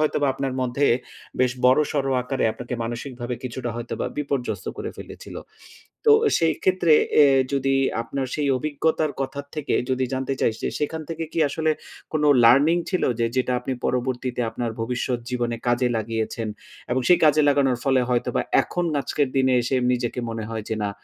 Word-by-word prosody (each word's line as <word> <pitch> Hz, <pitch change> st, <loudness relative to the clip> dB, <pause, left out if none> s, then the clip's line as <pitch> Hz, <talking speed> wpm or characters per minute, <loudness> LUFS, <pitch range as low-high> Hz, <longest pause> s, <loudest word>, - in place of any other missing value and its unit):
হয়তোবা 150 Hz, -1 st, +1 dB
আপনার 135 Hz, -1 st, -2 dB
মধ্যে, 130 Hz, +3 st, +1 dB, 0.5 s
বেশ 125 Hz, -1 st, +3 dB
বড়সড় 135 Hz, +1 st, +3 dB
আকারে 130 Hz, +1 st, -2 dB
আপনাকে 125 Hz, +2 st, -6 dB
মানসিকভাবে 120 Hz, +1 st, -5 dB
কিছুটা 125 Hz, 0 st, -4 dB
হয়তোবা 120 Hz, 0 st, -4 dB
বিপর্যস্ত 125 Hz, -9 st, -3 dB
করে -, -, -4 dB
ফেলেছিল। -, -, -10 dB, 0.7 s
তো 445 Hz, -, +7 dB, 0.3 s
সেই 165 Hz, -1 st, +3 dB
ক্ষেত্রে 185 Hz, -3 st, +3 dB, 0.3 s
এ -, -, +8 dB, 0.3 s
যদি 135 Hz, 0 st, +1 dB, 0.3 s
আপনার 130 Hz, +3 st, -3 dB
সেই 145 Hz, -2 st, 0 dB
অভিজ্ঞতার 155 Hz, +1 st, 0 dB
কথা 135 Hz, +1 st, -3 dB
থেকে 150 Hz, -2 st, -2 dB, 0.2 s
যদি 130 Hz, 0 st, +1 dB
জানতে 130 Hz, +1 st, -2 dB
চাই -, -, +2 dB
যে, -, -, 0 dB
সেখান 155 Hz, +2 st, -2 dB
থেকে 165 Hz, 0 st, -4 dB
কি -, -, -3 dB
আসলে 155 Hz, +2 st, 0 dB, 0.4 s
কোন 155 Hz, -1 st, 0 dB, 0.2 s
লার্নিং 140 Hz, +8 st, +6 dB
ছিল 185 Hz, -, 0 dB, 0.2 s
যে, 115 Hz, -, +3 dB
যেটা 130 Hz, 0 st, +1 dB
আপনি 130 Hz, +2 st, -3 dB
পরবর্তীতে 125 Hz, 0 st, -2 dB
আপনার 115 Hz, +1 st, -3 dB
ভবিষ্যৎ 125 Hz, +1 st, -1 dB
জীবনে 120 Hz, -1 st, -1 dB
কাজে 120 Hz, +1 st, +2 dB
লাগিয়েছেন 110 Hz, 0 st, -3 dB, 0.4 s
এবং 130 Hz, -, +1 dB
সেই 180 Hz, -, +6 dB
কাজে 155 Hz, 0 st, +5 dB
লাগানোর 135 Hz, -3 st, +2 dB
ফলে 135 Hz, -2 st, +3 dB
হয়তোবা, 120 Hz, -1 st, 0 dB, 0.2 s
এখন 175 Hz, -, -3 dB, 0.2 s
আজকের 140 Hz, +1 st, 0 dB
দিনে 130 Hz, -1 st, +3 dB
এসে, 130 Hz, +3 st, 0 dB, 0.2 s
নিজেকে 125 Hz, 0 st, -2 dB
মনে 115 Hz, -1 st, -4 dB
হয় 110 Hz, -2 st, -4 dB
যে -, -, +1 dB
না, 100 Hz, -, -1 dB
130 Hz, 165 wpm, -23 LUFS, 120-145 Hz, 0.7 s, এ